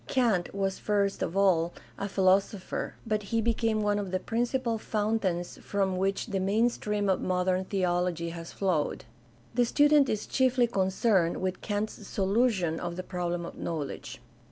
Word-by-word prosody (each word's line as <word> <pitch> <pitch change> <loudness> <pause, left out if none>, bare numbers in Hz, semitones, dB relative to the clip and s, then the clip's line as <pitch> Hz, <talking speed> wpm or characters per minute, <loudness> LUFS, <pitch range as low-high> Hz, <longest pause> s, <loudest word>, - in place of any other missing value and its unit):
Kant 225 -9 +1
was 195 -1 -1
first 200 -1 0
of 180 - -2
all 175 -4 +3 0.2
a 200 - -4
>philosopher, 190 0 +1
but 215 -2 0
he 225 +3 -1
became 225 -1 +1
one 205 0 +1
of 200 -2 -3
the 185 0 -1
principal 235 +2 -1
fountains 205 -5 -1
from 195 -2 0
which 195 +1 0
the 200 -4 -2
main 210 +5 +3
stream 210 -3 -2
of 190 - +2
modern 185 0 +1
theology 175 -3 0
has 165 0 -8
flowed. 175 -9 -1 0.5
The 245 +1 +3
student 290 +3 +4
is 215 -1 -1
chiefly 255 -2 +3
concerned 190 -4 +1
with 185 0 -3
Kant's 210 0 -3
solution 195 -4 +1
of 170 -1 -4
the 185 - -4
problem 175 -2 -3
of - - -9
knowledge. 155 -4 -4
195 Hz, 155 wpm, -29 LUFS, 180-220 Hz, 0.5 s, student